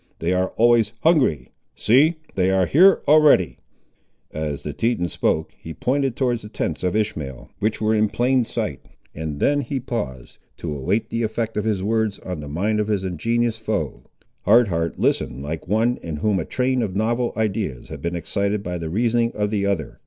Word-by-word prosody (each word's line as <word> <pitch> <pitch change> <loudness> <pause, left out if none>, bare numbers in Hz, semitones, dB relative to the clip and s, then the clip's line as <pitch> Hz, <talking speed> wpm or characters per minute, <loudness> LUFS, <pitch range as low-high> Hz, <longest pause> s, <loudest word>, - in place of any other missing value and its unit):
They 85 +2 0
are 90 0 +1
always 115 -1 +4
hungry. 130 - +2 0.2
See, 145 +9 +4 0.2
they 95 -1 +2
are 95 -1 +3
here 180 - +5
already!" 145 - +5 0.7
As 75 -2 -4
the - - -4
Teton 115 -7 0
spoke, 80 -1 0
he 80 -1 -9
pointed 135 - 0
towards 125 -3 0
the 105 - -10
tents 80 -6 -3
of 90 +2 0
Ishmael, 80 - -3
which 110 +1 0
were 110 0 +1
in 110 -1 +2
plain 125 +2 +2
sight, - - -4 0.3
and 75 -2 -5
then 145 0 +2
he 135 +1 -3
paused, 65 - -5 0.2
to 75 - -4
await 95 +11 -1
the 115 - -1
effect 110 0 -2
of 105 - -1
his 105 -4 0
words 110 -1 0
on 90 -3 -6
the 75 - -7
mind 105 +8 0
of 105 - 0
his 105 -3 0
ingenuous 115 +6 -1
foe. 105 -9 -3 0.4
Hard 115 +2 +5
Heart 85 -1 -1
listened 65 +3 0
like 80 +4 -5
one 115 +5 +2
in 80 -2 -5
whom 95 +5 +1
a 80 - -3
train 130 0 0
of 100 -5 -3
novel 115 +3 0
ideas 105 - -2
had - - -8
been 85 +1 -2
excited 100 +5 -1
by 90 -1 -4
the 80 -1 -4
reasoning 115 +4 +1
of 105 0 -1
the 100 -2 0
other. 85 -10 -2
105 Hz, 190 wpm, -22 LUFS, 85-115 Hz, 0.7 s, here